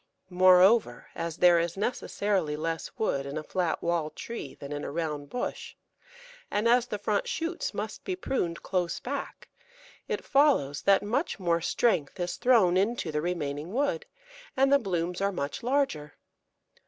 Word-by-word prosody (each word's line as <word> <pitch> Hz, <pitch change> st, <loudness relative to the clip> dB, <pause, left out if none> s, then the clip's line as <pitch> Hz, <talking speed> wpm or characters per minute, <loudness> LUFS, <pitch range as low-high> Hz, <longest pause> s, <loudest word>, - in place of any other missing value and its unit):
Moreover, 185 Hz, -, +5 dB
as 170 Hz, -1 st, -4 dB
there 175 Hz, -1 st, +6 dB
is 170 Hz, +2 st, -2 dB
necessarily 200 Hz, -6 st, -1 dB
less 165 Hz, +1 st, -3 dB
wood 140 Hz, -10 st, -1 dB
in 140 Hz, +2 st, -5 dB
a 155 Hz, -, -4 dB
flat 175 Hz, 0 st, -2 dB
wall 170 Hz, -2 st, 0 dB
tree 195 Hz, -, -7 dB
than 140 Hz, -, -9 dB
in 145 Hz, 0 st, -4 dB
a -, -, -4 dB
round 150 Hz, -2 st, -3 dB
bush, 245 Hz, -, -4 dB, 0.7 s
and 210 Hz, +3 st, +1 dB
as 245 Hz, +1 st, +4 dB
the 210 Hz, -, -3 dB
front 205 Hz, 0 st, -1 dB
shoots 335 Hz, +2 st, -2 dB
must 210 Hz, +1 st, -5 dB
be 375 Hz, -, -2 dB
pruned 180 Hz, -, -2 dB
close 175 Hz, -2 st, -1 dB
back, 280 Hz, +2 st, -6 dB, 0.6 s
it -, -, -3 dB
follows 270 Hz, -, +3 dB
that 195 Hz, 0 st, +4 dB
much 235 Hz, +5 st, -1 dB
more 170 Hz, -2 st, +1 dB
strength 180 Hz, -, 0 dB
is 175 Hz, 0 st, -2 dB
thrown 225 Hz, -8 st, +4 dB
into 200 Hz, -3 st, 0 dB
the 150 Hz, 0 st, -1 dB
remaining 155 Hz, -2 st, -3 dB
wood, 290 Hz, -, 0 dB, 0.5 s
and 270 Hz, +1 st, +4 dB
the 280 Hz, -, +6 dB
blooms 180 Hz, -4 st, -2 dB
are 200 Hz, 0 st, +1 dB
much 145 Hz, -6 st, -4 dB
larger. 240 Hz, -, -1 dB
180 Hz, 160 wpm, -28 LUFS, 160-235 Hz, 0.7 s, there